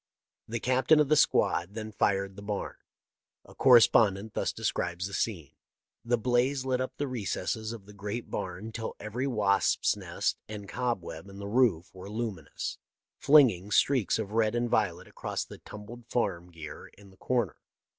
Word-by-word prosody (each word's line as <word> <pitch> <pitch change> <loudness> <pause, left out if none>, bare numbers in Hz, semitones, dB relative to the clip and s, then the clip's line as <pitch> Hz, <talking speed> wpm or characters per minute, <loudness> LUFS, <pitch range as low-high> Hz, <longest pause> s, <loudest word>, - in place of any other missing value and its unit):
The 115 +1 -3
captain 130 +6 +4
of 150 -2 +3
the 155 - +5
squad 100 - +2
then 110 -1 -5
fired 100 -2 0
the 100 - -9
barn. 100 0 -4 0.7
A - - -15
correspondent 110 -4 +5
thus - - 0
describes 90 +1 -2
the 100 - -6
scene: 90 - -2 0.2
" - - -63
' - - -63
The 120 +1 +1
blaze 125 +3 +1
lit 130 -1 0
up 130 - -4
the 145 - -1
recesses 110 -2 -3
of 115 -4 -9
the 105 - -13
great 105 +4 -5
barn 95 +5 -4
till 110 0 -5
every 115 +6 -3
wasp's 105 -6 +2
nest - - -2
and 105 -2 -7
cobweb 100 -8 -3
in 100 - -11
the 100 0 -6
roof 105 -7 +2
were 95 +1 -9
luminous, 105 -8 -4 0.4
flinging 125 -11 +5
streaks 125 -3 +3
of 105 -2 -4
red 110 0 +2
and 120 0 +1
violet 100 -6 0
across - - -4
the - - -12
tumbled 115 +3 -11
farm 90 -7 -1
gear 80 -2 -9
in 100 -1 -16
the 95 - -21
corner. 120 -1 -1
110 Hz, 175 wpm, -29 LUFS, 100-120 Hz, 0.7 s, the